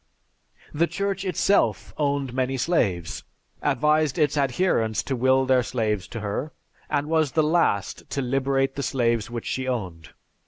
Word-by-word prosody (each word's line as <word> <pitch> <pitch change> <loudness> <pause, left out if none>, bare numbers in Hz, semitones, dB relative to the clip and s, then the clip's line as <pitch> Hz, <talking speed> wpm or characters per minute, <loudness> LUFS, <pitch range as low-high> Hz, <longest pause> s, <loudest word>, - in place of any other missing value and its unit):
The 165 +3 +2
Church 195 0 -2
itself 195 +1 +1
owned 140 -3 -1
many 130 +1 -1
slaves, 105 - 0 0.4
advised 150 +1 +2
its 150 -2 +2
adherents 135 - +1
to 135 - -2
will 130 +2 +3
their 130 -1 +4
slaves 110 -6 -1
to 115 - -6
her, 105 +9 -3 0.4
and 145 -1 0
was 155 -4 +1
the 155 - +3
last 150 - 0
to - - -3
liberate 135 +1 +1
the 140 - -3
slaves 115 -5 0
which 120 -1 -5
she 130 0 -2
owned. 90 -10 -4
135 Hz, 150 wpm, -24 LUFS, 120-150 Hz, 0.4 s, their